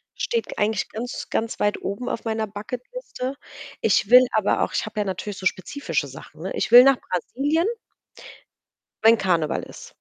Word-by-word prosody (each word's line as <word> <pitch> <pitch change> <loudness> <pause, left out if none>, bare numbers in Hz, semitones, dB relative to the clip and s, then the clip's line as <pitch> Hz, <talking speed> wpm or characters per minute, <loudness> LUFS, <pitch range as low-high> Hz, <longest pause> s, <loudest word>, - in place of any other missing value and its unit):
steht 470 -1 -2
eigentlich 215 +1 0
ganz, 240 +3 -6
ganz 225 0 -2
weit 205 0 +1
oben 200 +6 -4
auf - - -4
meiner 220 -1 -1
Bucket-Liste. 250 - -6 0.5
Ich 205 - +2
will 250 +1 +8
aber 215 -2 +2
auch - - -3
ich - - -1
habe 215 0 -6
ja - - -1
natürlich 195 +2 -4
so 190 - -8
spezifische 185 - -2
Sachen, 135 +4 -12
ne? 190 - -4
Ich - - -2
will 245 +1 +11
nach 270 -2 +5
Brasilien 290 - -1 1.4
wenn 225 0 +7
Karneval 170 -6 0
ist. - - -12
220 Hz, 170 wpm, -23 LUFS, 195-250 Hz, 1.4 s, will